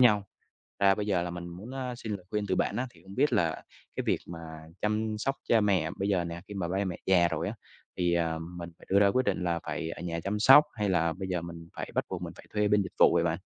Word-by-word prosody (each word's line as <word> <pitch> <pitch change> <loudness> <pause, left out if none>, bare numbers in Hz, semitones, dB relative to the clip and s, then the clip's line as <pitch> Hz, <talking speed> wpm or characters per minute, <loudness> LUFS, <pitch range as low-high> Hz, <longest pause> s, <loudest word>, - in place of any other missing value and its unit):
nhau. 105 -5 +5 0.6
Ra 100 -1 +5
bây 105 - -2
giờ 95 -4 +2
là 90 - -3
mình 85 0 -6
muốn, 95 +8 -9
a, 125 -2 -3
xin 110 -2 -5
lời 90 -2 -11
khuyên 105 -1 -1
từ 95 - +1
bạn - - 0
á, 130 +1 -1
thì - - -20
hông 95 +1 -11
biết 140 0 +3
là 85 -7 +1 0.3
cái - - -1
việc - - +2
mà 85 -1 -7 0.4
chăm 110 +1 0
sóc 135 +4 0
cha 115 - +5
mẹ 95 -6 +2
bây 100 +1 0
giờ 95 -3 +2
nè, 85 0 -6
khi 105 - -7
mà 95 -4 -2
ba 95 +3 -1
mẹ 90 -3 -3
già 90 -2 +5
rồi 85 - -2
á, 105 - -3 0.4
thì, 90 -1 +2
à, 80 -1 +1 0.2
mình 85 -1 -6
phải - - -17
đưa 100 +1 +5
ra 100 - +6
quyết 130 +6 +2
định 95 -2 0
là 85 -1 0
phải 80 - -3
ở 85 - -6
nhà 85 -1 -3
chăm 105 +2 -1
sóc? 135 +7 +9
Hay 105 -3 -1
là 85 -3 +2
bây 95 +2 -5
giờ 90 -2 -1
mình 85 -1 -8
phải - - -5
bắt - - +1
buộc - - -4
mình - - -5
phải - - -13
thuê 105 -1 +2
bên 105 0 +4
dịch 90 - -8
vụ - - +7
vậy - - +4
bạn? - - 0
95 Hz, 290 wpm, -29 LUFS, 85-105 Hz, 0.6 s, sóc